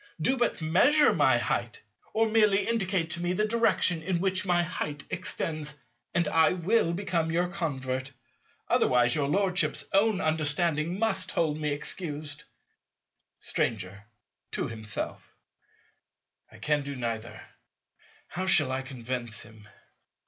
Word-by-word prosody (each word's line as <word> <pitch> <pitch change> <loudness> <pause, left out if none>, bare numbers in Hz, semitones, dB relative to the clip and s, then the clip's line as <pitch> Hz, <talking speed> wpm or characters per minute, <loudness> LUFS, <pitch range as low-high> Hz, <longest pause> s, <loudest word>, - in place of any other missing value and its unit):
Do 210 +12 +2
but 240 -9 -1
measure 255 - +5
my - - +4
"height," - - -2 0.3
or 225 +1 +2
merely 210 -2 +3
indicate 190 -7 0
to 170 - -1
me 175 +1 0
the 210 +3 +1
direction 215 -6 +2
in 175 +1 -1
which 190 +1 0
my 175 -1 +3
"height" 150 -4 -4
extends, 155 -2 -3 0.4
and 170 -2 +2
I 160 +2 +4
will 180 +1 +1
become 175 -4 -1
your 175 +2 +1
convert. 135 -7 -3 0.6
Otherwise, 120 -1 +3
your 145 -2 0
Lordship's 185 +3 +1
own 200 0 +3
understand 155 +1 0
must 220 -4 0
hold 155 -2 0
me 150 -1 -1
excused. 150 0 -3 0.9
Stranger. 100 -1 -2 0.5
(to - - -1
himself.) 110 -1 -6 1.2
I - - -14
can 150 -1 0
do 140 0 -6
neither. 115 -2 -4 0.9
How 185 +4 -4
shall 145 -7 +4
I 130 0 -1
convince 125 -3 -4
him? 110 -1 -16
160 Hz, 130 wpm, -28 LUFS, 140-185 Hz, 1.2 s, measure